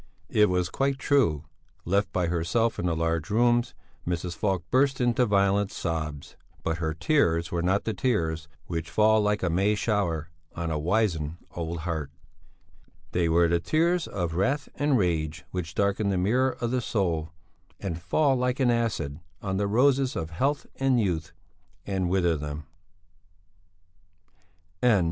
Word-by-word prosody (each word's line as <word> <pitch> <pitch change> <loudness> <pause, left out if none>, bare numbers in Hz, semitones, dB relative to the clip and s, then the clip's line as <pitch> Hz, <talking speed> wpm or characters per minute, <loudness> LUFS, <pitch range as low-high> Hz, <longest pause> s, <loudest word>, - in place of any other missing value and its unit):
It 105 -2 +4
was 90 -1 0
quite 135 0 0
true. 120 - +2 0.4
Left 100 +4 +1
by 90 -1 0
herself 90 +8 0
in 90 - 0
the 85 - +1
large 80 0 -1
rooms 120 -2 +2 0.3
Mrs. 85 -1 -2
Falk 95 -1 0
burst 135 +1 +3
into 120 0 +2
violent 100 0 +2
sobs; 80 -4 -4 0.3
but 80 +1 -1
her 80 -2 -1
tears 85 - +1
were 85 - -1
not 95 +4 +1
the 110 - -2
tears 85 -9 -1 0.2
which 85 -1 -4
fall 110 +3 +4
like 105 -1 0
a 90 - +2
May 100 +5 +2
shower 85 -7 -1 0.2
on 85 -1 -3
a 75 - -1
wizened 85 -3 0
old 85 -1 -4
heart; 80 -4 -3 1.0
they 85 -2 +1
were 85 +1 +4
the 85 0 +2
tears 165 - +1
of 85 -4 -3
wrath 135 - 0
and 145 -2 +2
rage 80 -5 -1
which 90 -1 -4
darken 100 +1 +1
the 95 - +1
mirror 125 +8 +1
of 120 0 -1
the 130 -1 +1
soul 85 -9 -1 0.5
and 85 -4 -4
fall 135 - +2
like 125 +1 0
an 125 -2 +4
acid 105 -12 -1 0.2
on 95 -1 -2
the 100 0 +1
roses 130 +4 +3
of 80 0 -4
health 140 - 0
and 135 -2 +2
youth 85 -7 -1 0.5
and 95 -3 -1
wither 85 -3 +2
them. 75 0 -5
95 Hz, 155 wpm, -27 LUFS, 85-115 Hz, 1.0 s, It